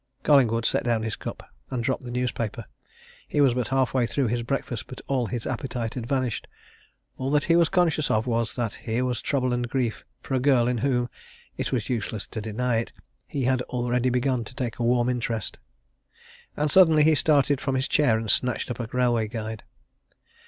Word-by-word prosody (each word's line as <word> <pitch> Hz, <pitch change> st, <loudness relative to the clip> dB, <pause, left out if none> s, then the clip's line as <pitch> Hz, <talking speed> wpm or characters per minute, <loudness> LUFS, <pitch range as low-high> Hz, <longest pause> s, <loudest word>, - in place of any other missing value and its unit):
Collingwood 115 Hz, -6 st, +4 dB
set -, -, +2 dB
down 115 Hz, -2 st, +1 dB
his 110 Hz, -1 st, -2 dB
cup, -, -, -7 dB, 0.3 s
and 125 Hz, -2 st, -2 dB
dropped 130 Hz, +2 st, 0 dB
the 125 Hz, -, -7 dB
newspaper. 120 Hz, -2 st, -2 dB, 0.6 s
He -, -, -1 dB
was 135 Hz, -4 st, +5 dB
but 125 Hz, -3 st, -1 dB
half 135 Hz, -1 st, +1 dB
way 125 Hz, -3 st, +2 dB
through 125 Hz, +1 st, 0 dB
his 120 Hz, +1 st, 0 dB
breakfast, 120 Hz, -2 st, -3 dB
but 130 Hz, -, -9 dB
all 130 Hz, -4 st, 0 dB
his 120 Hz, -1 st, -4 dB
appetite 120 Hz, -4 st, -3 dB
had 120 Hz, -3 st, -5 dB
vanished. 130 Hz, -4 st, -1 dB, 0.7 s
All 130 Hz, +1 st, -1 dB
that 145 Hz, 0 st, +2 dB
he 170 Hz, -, +3 dB
was 170 Hz, -1 st, +4 dB
conscious 170 Hz, -5 st, +2 dB
of 110 Hz, +1 st, +1 dB
was 115 Hz, -2 st, -1 dB
that 120 Hz, -4 st, -2 dB
here 120 Hz, +2 st, -2 dB
was 125 Hz, -2 st, -2 dB
trouble 130 Hz, -3 st, 0 dB
and 120 Hz, 0 st, -1 dB
grief 120 Hz, -3 st, -1 dB, 0.2 s
for 135 Hz, -, -6 dB
a 130 Hz, -, +3 dB
girl 125 Hz, -3 st, +3 dB
in 125 Hz, -1 st, 0 dB
whom 125 Hz, -1 st, +1 dB, 0.5 s
it -, -, -3 dB
was 120 Hz, -5 st, -1 dB
useless 110 Hz, -3 st, -3 dB
to 110 Hz, -, -4 dB
deny 115 Hz, +3 st, -1 dB
it 115 Hz, -, -2 dB, 0.4 s
he 140 Hz, -, -3 dB
had 130 Hz, 0 st, +2 dB
already 125 Hz, 0 st, 0 dB
begun 125 Hz, 0 st, +1 dB
to 125 Hz, -, -11 dB
take 125 Hz, -4 st, -3 dB
a -, -, 0 dB
warm 120 Hz, 0 st, +3 dB
interest. 115 Hz, -3 st, -2 dB, 1.0 s
And 150 Hz, 0 st, 0 dB
suddenly 160 Hz, -4 st, +6 dB
he 160 Hz, +1 st, +5 dB
started 145 Hz, -2 st, +3 dB
from 135 Hz, -1 st, -1 dB
his 130 Hz, +1 st, 0 dB
chair 140 Hz, -7 st, +3 dB
and 110 Hz, 0 st, -4 dB
snatched 125 Hz, +3 st, 0 dB
up 125 Hz, -, -5 dB
a 120 Hz, -, -3 dB
railway 120 Hz, -2 st, +1 dB
guide. 110 Hz, -1 st, -5 dB
125 Hz, 200 wpm, -25 LUFS, 115-135 Hz, 1.0 s, suddenly